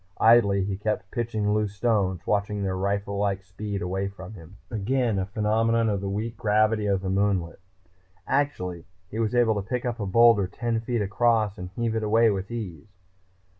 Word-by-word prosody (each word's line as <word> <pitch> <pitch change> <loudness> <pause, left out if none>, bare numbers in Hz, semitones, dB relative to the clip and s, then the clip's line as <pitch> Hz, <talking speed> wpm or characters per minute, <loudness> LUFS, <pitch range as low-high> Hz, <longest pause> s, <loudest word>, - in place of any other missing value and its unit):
Idly, 105 -4 +5
he 95 0 -3
kept 105 -2 -3
pitching 110 -3 -1
loose 105 -1 -1
stones, 100 -5 0
watching 100 0 0
their 95 -1 -1
rifle 100 +1 -2
like 100 -1 -1
speed 100 +2 -5
away 95 +2 -2
from 100 +1 -9
him. 90 0 -13
Again 115 0 0
a 95 - -2
phenomenon 110 +2 +1
of 100 -2 -1
the 100 - -3
weak 110 +4 -3
gravity 110 0 +2
of 100 -2 +1
the 95 - -3
moonlet. 95 -4 0 0.7
Actually, 90 - -1 0.3
he 110 - -4
was 115 +1 0
able 120 -2 +4
to 95 - -14
pick 125 -1 -2
up 120 -1 -2
a 100 - -2
boulder 115 -1 +5
ten 115 +4 -2
feet 115 -1 -1
across 110 0 +1
and 90 0 -6
heave 115 -1 -1
it 110 - 0
away 110 +1 +4
with 95 -1 -3
ease. 100 -5 -7
105 Hz, 185 wpm, -26 LUFS, 95-115 Hz, 0.7 s, Idly